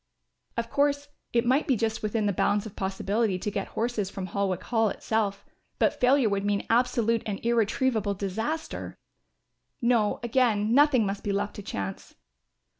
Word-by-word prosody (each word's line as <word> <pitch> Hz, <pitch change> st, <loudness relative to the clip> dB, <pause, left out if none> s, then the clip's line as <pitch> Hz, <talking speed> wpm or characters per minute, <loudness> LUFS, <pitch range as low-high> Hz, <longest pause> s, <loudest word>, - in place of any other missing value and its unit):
Of 230 Hz, 0 st, -2 dB
course 285 Hz, 0 st, +1 dB, 0.2 s
it 235 Hz, 0 st, +2 dB
might 260 Hz, +5 st, +2 dB
be 265 Hz, -, +3 dB
just 225 Hz, 0 st, -1 dB
within 215 Hz, 0 st, -1 dB
the 200 Hz, -, +1 dB
bounds 205 Hz, +3 st, +1 dB
of 215 Hz, -1 st, -9 dB
possibility 195 Hz, +1 st, 0 dB
to 205 Hz, +3 st, -3 dB
get 200 Hz, -1 st, -3 dB
horses 225 Hz, -4 st, -2 dB
from 195 Hz, -1 st, -5 dB
Holwick 190 Hz, -1 st, -1 dB
Hall 225 Hz, -2 st, +2 dB
itself; 200 Hz, -2 st, -2 dB, 0.3 s
but -, -, +1 dB
failure 255 Hz, 0 st, +4 dB
would 200 Hz, -1 st, 0 dB
mean 205 Hz, 0 st, 0 dB
absolute 230 Hz, -1 st, +2 dB
and 200 Hz, -2 st, -3 dB
irretrievable 230 Hz, -2 st, +1 dB
disaster. 220 Hz, -, -4 dB, 0.8 s
No 235 Hz, -4 st, +2 dB
again, 230 Hz, -3 st, +2 dB
nothing 275 Hz, -4 st, +5 dB
must 195 Hz, 0 st, -3 dB
be 205 Hz, -, -1 dB
left 205 Hz, +1 st, -2 dB
to -, -, -5 dB
chance. 95 Hz, -, -6 dB
220 Hz, 160 wpm, -27 LUFS, 200-240 Hz, 0.8 s, nothing